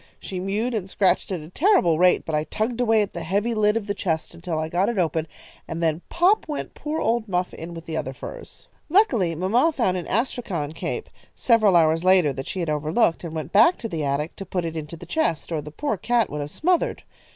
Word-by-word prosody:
She 185 - -6
mewed 210 +6 -1
and 200 -4 -3
scratched 190 0 +1
at 180 -4 -2
a 155 - -11
terrible 185 - +3
rate, 180 0 +4
but 160 - -4
I 150 0 +1
tugged 230 +6 -2
away 225 -3 +4
at 200 - -7
the 170 - -5
heavy 200 +8 0
lid 210 0 +2
of 220 - -3
the 200 - -2
chest 165 -5 -2
until 170 -1 -4
I 155 0 -1
got 175 +6 +1
it 235 - -3
open, 160 -3 0 0.4
and 165 +1 -4
then 160 0 +1
pop 360 +4 +3
went 300 -2 -5
poor 305 +1 -4
old 230 0 0
Muff 180 -1 -1
in 170 +1 -8
with 165 0 -9
the 160 -1 -4
other 130 - -3
furs. - - -10 0.2
"Luckily, 245 - +3
mamma 225 - +2
found 210 -11 0
an 175 - -5
astrakhan 200 - -2
cape, 440 - -4 0.3
several 215 -6 +4
hours 165 0 +4
later, 185 -6 +4
that 135 0 -6
she 185 - -3
had 170 - -2
overlooked, 160 +5 +1
and 165 -2 -6
went 155 0 -5
back 225 - +5
to 230 - -5
the 165 -7 -3
attic 145 +3 -1
to - - -5
put 180 -2 -2
it 165 -1 -4
into 160 +1 -6
the 175 - -10
chest, 175 - -1
or 160 -2 -1
the 150 - -9
poor 250 - -2
cat 235 +1 +1
would 150 0 -3
have 145 - -5
smothered. 345 - 0
185 Hz, 235 wpm, -24 LUFS, 160-230 Hz, 0.4 s, back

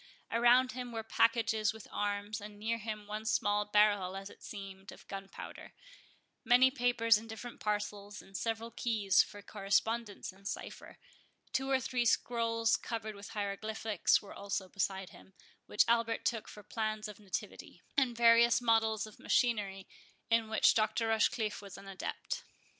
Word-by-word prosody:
Around 240 +2 +5
him 245 0 -6
were 225 -1 -4
packages 220 -2 +2
with 220 - -11
arms, 205 +1 -2
and 205 0 -9
near 225 +2 -1
him 215 -1 -5
one 210 +1 -5
small 210 -1 +1
barrel, 205 -3 +3
as 195 +1 -8
it - - -17
seemed, 195 -2 -8
of - - -15
gunpowder; 195 0 -8 0.7
many 250 +2 +6
papers 240 -4 +3
in 225 - -11
different 225 +2 -8
parcels, 210 -1 -3
and 195 - -14
several 225 +2 -2
keys 220 -4 +3
for 205 0 -7
correspondence 205 +1 -1
in 195 +1 -20
cipher; - - -6 0.6
two 265 0 0
or 265 -1 +3
three 250 -1 0
scrolls 230 -1 +2
covered 220 -2 -4
with 200 0 -10
hieroglyphics 210 +1 0
were 200 - -10
also 200 -1 -3
beside 190 -1 -2
him, 190 - -16 0.3
which - - +4
Albert 230 -1 +1
took 225 -3 -1
for 210 - -11
plans 215 0 -3
of 210 -1 -10
nativity; 200 -3 -6
and 255 -4 +2
various 235 0 +6
models 225 -2 +2
of 215 - -14
machinery, 205 -6 +1 0.4
in 225 -1 +3
which 220 - +5
Dr. 225 +1 +1
Rochecliffe 220 -1 +1
was 200 -2 -10
an 195 0 -12
adept. 195 -1 -4
215 Hz, 155 wpm, -33 LUFS, 205-230 Hz, 0.7 s, many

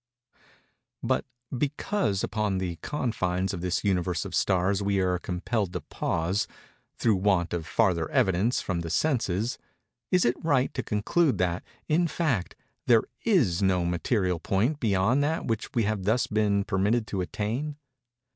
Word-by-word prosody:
But - - +1 0.3
because 140 - -1
upon 105 -2 -1
the 90 -3 -3
confines 95 - -1
of 90 - -4
this 90 0 -1
Universe 90 -5 0
of - - -7
Stars 95 +2 +2
we 100 0 +1
are 90 -1 +1
compelled 95 +2 -2
to - - -3
pause, 85 +5 -1 0.5
through 110 -4 +2
want 95 -3 +1
of 85 -2 -3
farther 85 -4 +1
evidence 95 +6 +2
from 95 -3 -2
the 85 -1 -4
senses, 115 - 0 0.5
is 180 -1 +3
it 120 +1 0
right 140 -5 +2
to - - -2
conclude 130 +8 +1
that, 90 -1 0 0.2
in 170 +3 +3
fact, 140 - -1 0.3
there 115 -2 +6 0.2
is 130 - +3
no 95 -2 +2
material 90 +1 0
point 115 - 0
beyond 110 +5 +2
that 160 +3 -1
which 115 -2 -2
we 115 - +3
have 105 -2 -1
thus 110 +4 +2
been 105 -2 +1
permitted 105 +4 +1
to 95 -3 -3
attain? 115 +11 -3
100 Hz, 150 wpm, -27 LUFS, 90-120 Hz, 0.5 s, there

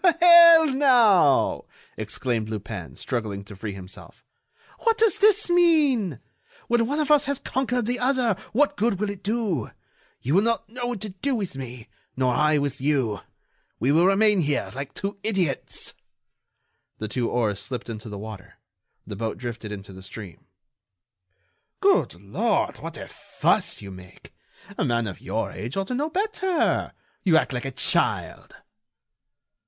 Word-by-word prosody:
"Well, 340 -2 +9
now!" 240 - +4 0.3
exclaimed 115 -4 -3
Lupin, 105 -4 -6
struggling 110 -6 -4
to 100 +1 -12
free 100 +1 -6
himself, 95 -1 -12 0.6
"what 455 -1 +2
does 440 -3 +3
this 425 0 +4
mean? 295 - +3 0.5
When 235 -1 +2
one 290 +4 -1
of 300 -1 0
us 295 0 +5
has 280 -1 -1
conquered 250 -3 -2
the 245 +2 -1
other, 250 -4 +1 0.2
what 280 +3 +2
good 205 -2 0
will 210 -1 -1
it 200 -2 -10
do? 200 - -1 0.5
You 135 - -2
will 190 - +5
not 230 +1 -1
know 245 +3 -5
what 245 -5 -4
to 215 - -4
do 255 +9 -2
with 200 - -4
me, 125 -3 -8 0.3
nor 130 -1 +2
I 150 +3 +3
with 140 -2 -2
you. 130 -8 0 0.6
We 130 - +2
will 165 +4 +4
remain 205 0 +4
here 145 -2 -1
like 135 +1 -7
two 200 0 -4
idiots." 185 -11 -1 1.0
The 110 - -4
two 120 +2 -2
oars 110 -5 0
slipped 120 +5 -6
into 110 -1 -7
the 105 - -7
water. 105 -2 -9 0.5
The 105 - -7
boat 110 +1 -3
drifted 120 -3 -6
into 100 -1 -8
the 95 - -11
stream. 95 -1 -10 1.3
"Good 85 - +2
Lord, 100 +1 -1
what - - -8
a - - -8
fuss - - -1
you 100 - -8
make! 90 -1 -14 0.5
A - - +2
man 120 -4 0
of 95 -5 -7
your - - -3
age 115 - -6
ought 195 0 -2
to - - -2
know 290 +5 -1
better! 380 -2 0 0.3
You 170 -5 +5
act 150 - 0
like 125 +1 -4
a - - -2
child." 130 - 0
165 Hz, 160 wpm, -24 LUFS, -, 1.3 s, Well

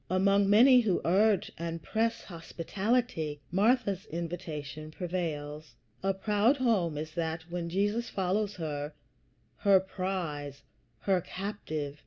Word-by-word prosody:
Among 195 +2 +3
many 250 +5 +8
who 215 -7 +2
urge 200 +2 +3
and 165 -1 -4
press 230 +1 0
hospitality, 170 0 -2
Martha's 200 0 +2
invitation 160 -3 -5
prevails. 155 -5 -4 0.3
A 195 - +2
proud 210 +7 +2
home 200 - +1
is 155 +1 -4
that, 160 -1 -2
when 170 -1 -3
Jesus 205 +6 0
follows 200 +2 -1
her 150 -3 -4 0.6
her 195 -2 +5
prize, 175 -7 -4 0.4
her 190 -2 +2
captive. 155 -8 -5
185 Hz, 115 wpm, -30 LUFS, 160-205 Hz, 0.6 s, many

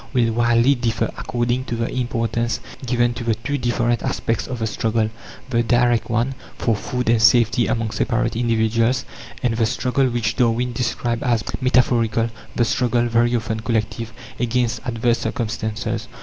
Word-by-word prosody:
will 115 -3 +2
widely 120 +3 +4
differ 120 -3 -1
according 120 +1 -1
to 120 - -4
the 115 0 -1
importance 115 -2 -1 0.3
given 120 0 +2
to 120 - -6
the 115 -1 +1
two 140 +6 -3
different 120 -2 0
aspects 115 -1 -1
of 125 - -4
the 115 - -2
struggle: 110 0 0 0.4
the 115 -1 +3
direct 120 0 +2
one, 120 +4 +1 0.2
for 115 - +1
food 125 +4 -3
and 115 -1 +3
safety 120 +1 +4
among 115 -1 -1
separate 115 0 0
individuals, 115 +1 +1 0.4
and 120 -2 +1
the 115 - +3
struggle 130 +3 +1
which 115 -2 -1
Darwin 120 0 +1
described 120 -1 -1
as 120 -3 +1 0.2
"metaphorical" 115 -3 +2 0.2
the 120 - +3
struggle, 120 0 +1
very 120 +1 +2
often 110 -1 -2
collective, 115 0 -2 0.3
against 120 -1 0
adverse 120 0 +1
circumstances. 115 -2 -3
120 Hz, 155 wpm, -21 LUFS, 115-120 Hz, 0.4 s, widely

